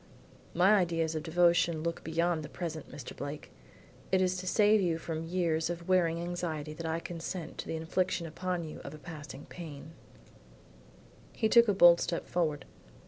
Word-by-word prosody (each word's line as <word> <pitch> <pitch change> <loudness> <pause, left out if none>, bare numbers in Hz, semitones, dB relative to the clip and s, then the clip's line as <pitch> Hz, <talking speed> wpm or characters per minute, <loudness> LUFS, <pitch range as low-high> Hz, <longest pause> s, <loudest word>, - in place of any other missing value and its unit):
"My 185 +4 +5
ideas 165 -3 +1
of 155 - -2
devotion 170 -1 +3
look 170 0 -3
beyond 170 0 0
the 150 - -8
present, 160 -4 -5
Mr. 130 - -8
Blake. 145 +2 -6 0.6
It 190 - +4
is 185 0 +2
to 185 0 -6
save 210 +2 +4
you 170 -3 +1
from 165 0 -5
years 165 -2 0
of 170 0 -5
wearing 170 -3 +3
anxiety 170 -3 -3
that 165 +1 -5
I 160 +1 -1
consent 170 0 -6
to - - -5
the - - -3
infliction 170 +2 -1
upon 180 +2 -3
you 155 - -8
of - - -8
a - - -10
passing 150 -3 -9
pang." 155 -3 -9 1.4
He 220 - +1
took 235 +1 +6
a 205 - +3
bold 175 -2 +7
step 170 - -2
forward. 155 -5 -1
170 Hz, 175 wpm, -31 LUFS, 160-180 Hz, 1.4 s, bold